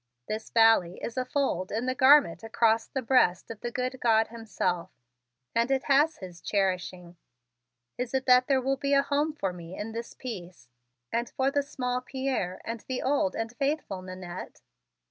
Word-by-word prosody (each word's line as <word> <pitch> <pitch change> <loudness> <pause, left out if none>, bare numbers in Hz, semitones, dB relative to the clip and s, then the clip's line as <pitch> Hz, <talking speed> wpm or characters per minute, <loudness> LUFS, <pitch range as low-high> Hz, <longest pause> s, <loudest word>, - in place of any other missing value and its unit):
This 220 +1 -4
valley 225 -6 +4
is 230 - -4
a 255 -1 -1
fold 250 -9 -1
in 225 +4 -1
the 255 - 0
garment 260 - +5
across 225 0 +2
the 265 - -4
breast 230 -7 +3
of 225 - -8
the 240 - -3
good 255 +1 -3
God 225 -2 +3
Himself 195 -6 -2 0.6
and 235 +2 +2
it 270 -1 +1
has 295 +3 +3
His 180 -3 -10
cherishing. 185 -3 -2 0.8
Is 250 +1 -2
it 265 0 0
that 250 0 +5
there 270 -2 +3
will 270 +1 0
be 280 +1 +1
a 275 - +4
home 290 +2 0
for 195 -12 -3
me 175 0 -9
in 220 +2 -5
its 230 0 -6
peace 185 - -8 0.5
and 235 +1 0
for 270 +1 0
the 285 - +2
small 250 -3 -3
Pierre 255 -8 -3
and 230 0 -4
the 260 -1 -3
old 265 -9 +1
and 225 +1 -4
faithful 275 -9 -1
Nannette?" 185 -1 -8
235 Hz, 180 wpm, -28 LUFS, 190-265 Hz, 0.8 s, garment